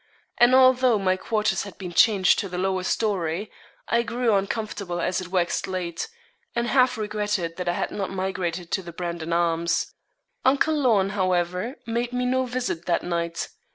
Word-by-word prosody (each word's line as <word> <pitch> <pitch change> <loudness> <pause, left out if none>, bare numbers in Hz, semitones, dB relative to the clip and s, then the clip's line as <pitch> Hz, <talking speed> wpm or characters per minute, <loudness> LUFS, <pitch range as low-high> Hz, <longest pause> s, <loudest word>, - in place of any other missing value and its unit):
And 245 +2 +6
although 255 -2 +5
my 185 -2 +1
quarters 215 +3 0
had 200 -2 -8
been 180 -3 -7
changed 195 0 +5
to 200 - -3
the 180 - -5
lower 190 0 0
storey, 190 -1 -1 0.4
I 235 +1 +2
grew 235 0 0
uncomfortable 200 -2 -2
as 180 +2 0
it 185 - -7
waxed 180 -2 0
late, 180 -3 -3 0.5
and 235 0 +1
half 255 0 +3
regretted 210 -5 -2
that 180 -1 -2
I - - +1
had - - -2
not 195 -2 -3
migrated 185 -2 -3
to - - 0
the 170 -2 -10
'Brandon 170 -1 -4
Arms.' 170 0 +1 0.5
Uncle 280 +4 +3
Lorne, 230 -10 +3
however, 185 +4 0
made 235 +1 -2
me 250 0 0
no 260 +1 +1
visit 245 -9 -3
that 170 - +1
night. 170 -1 -2
195 Hz, 170 wpm, -25 LUFS, 175-235 Hz, 0.5 s, And